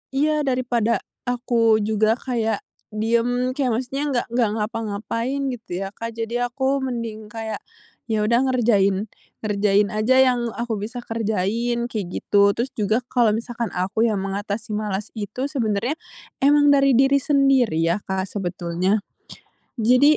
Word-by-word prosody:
Iya, 305 +2 +2
daripada 240 -3 +1 0.2
aku 230 -3 +2
juga 215 +1 +2
kayak 225 -5 -2 0.3
diem, 235 +3 +1
kayak 260 -2 0
maksudnya 260 +3 -3
nggak 240 - +1
nggak 235 -3 +2
ngapa-ngapain 230 +5 -2
gitu 195 -6 -5
ya 195 - -5
Kak, 230 +1 -6
jadi 235 +2 -1
aku 265 +2 0
mending 230 -5 -4
kayak 220 -1 -5 0.5
ya 220 -2 0
udah 235 +3 +3
ngerjain 210 -5 +2 0.3
ngerjain 205 -1 +2
aja 215 +5 +2 0.2
yang 240 -1 -1
aku 230 -3 -2
bisa 240 +4 -6
kerjain, 225 +2 -1
kayak 210 -5 -3
gitu. 200 +2 +2
Terus 240 +3 -2
juga 215 +1 0
kalau 230 -4 +3
misalkan 235 0 -3
aku 195 +5 +1
yang 215 -3 0
mengatasi 205 +3 -4
malas 210 -1 -3
itu 215 +4 -5
sebenernya 225 -2 0 0.5
emang 290 +1 +5
dari 275 -2 +4
diri 270 +2 +4
sendiri 275 - +3
ya 170 +4 +1
Kak 190 0 -1
sebetulnya. 185 +1 -1 0.7
Jadi 250 +6 +5
230 Hz, 140 wpm, -22 LUFS, 210-245 Hz, 0.7 s, emang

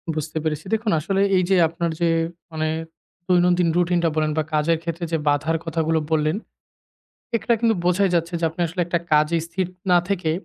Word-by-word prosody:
বুঝতে 155 +1 -4
পেরেছি। 155 +1 -2
দেখুন 220 -1 0
আসলে 195 +5 0
এই 185 - +3
যে 190 - +4
আপনার 170 +1 -3
যে 170 - +3 0.4
মানে 155 0 -2 0.6
দৈনন্দিন 180 -1 +3
রুটিনটা 175 -1 +2
বলেন 155 -1 +1
বা 155 - +2
কাজের 155 +2 +2
ক্ষেত্রে 170 +1 -3
যে 165 - +2
বাধার 155 +3 +2
কথাগুলো 160 -1 0
বললেন। 155 +3 +1 1.0
এখানে 235 +1 +1
কিন্তু 230 -1 +3
বোঝাই 180 +2 +2
যাচ্ছে 170 +1 0
যে - - 0
আপনি 165 - -9
আসলে 180 +2 -4
একটা 170 0 0
কাজেই 155 +2 +3
স্থির 185 +2 -2 0.2
না 180 - +6
থেকে 180 -5 0
170 Hz, 180 wpm, -22 LUFS, 160-180 Hz, 1.0 s, না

